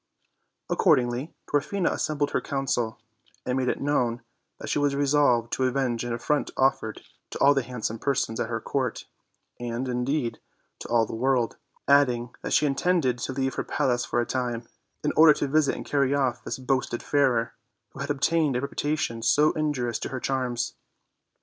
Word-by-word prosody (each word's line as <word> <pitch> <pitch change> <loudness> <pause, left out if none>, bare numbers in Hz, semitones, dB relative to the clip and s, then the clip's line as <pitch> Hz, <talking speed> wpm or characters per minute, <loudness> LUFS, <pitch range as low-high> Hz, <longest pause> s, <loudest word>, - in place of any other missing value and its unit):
Accordingly, 125 +4 +2 0.2
Dwarfina 165 +6 0
assembled 145 -1 -1
her - - 0
council, 125 -5 -1 0.5
and 125 - 0
made 130 -1 0
it - - -1
known 125 -5 0 0.3
that - - -8
she - - 0
was 145 -1 +1
resolved 140 -5 +2
to 130 - +1
avenge 130 -2 0
an 120 - -3
affront 120 +6 0
offered 130 -5 +1 0.3
to - - -6
all 140 - +5
the 135 - +1
handsome 115 -2 -4
persons 135 -5 -1
at 115 - -1
her 115 -1 -2
court, 130 0 -2 0.5
and, 120 +1 -3
indeed, 125 -1 -1 0.4
to - - -7
all 115 -1 +3
the - - -8
world; 125 0 +1 0.3
adding 125 -4 +3
that - - -5
she 150 - +4
intended 140 -3 +1
to 120 - -3
leave 135 0 -1
her - - -2
palace 120 -2 0
for - - -1
a 120 - +1
time, 120 -2 -3 0.4
in - - +1
order 155 -1 +8
to - - -1
visit 150 +1 +2
and - - -7
carry 140 -1 +1
off 130 -4 0
this - - -4
boasted 130 -2 -1
Fairer, 130 -5 +2 0.4
who - - -12
had 140 +1 -4
obtained 145 0 +1
a 125 - 0
reputation 140 -4 -2
so 145 +7 +4
in 155 -1 0
jurious 120 -4 -2
to - - -4
their 130 - -4
charms. 125 -3 -1
130 Hz, 180 wpm, -26 LUFS, 120-145 Hz, 0.5 s, order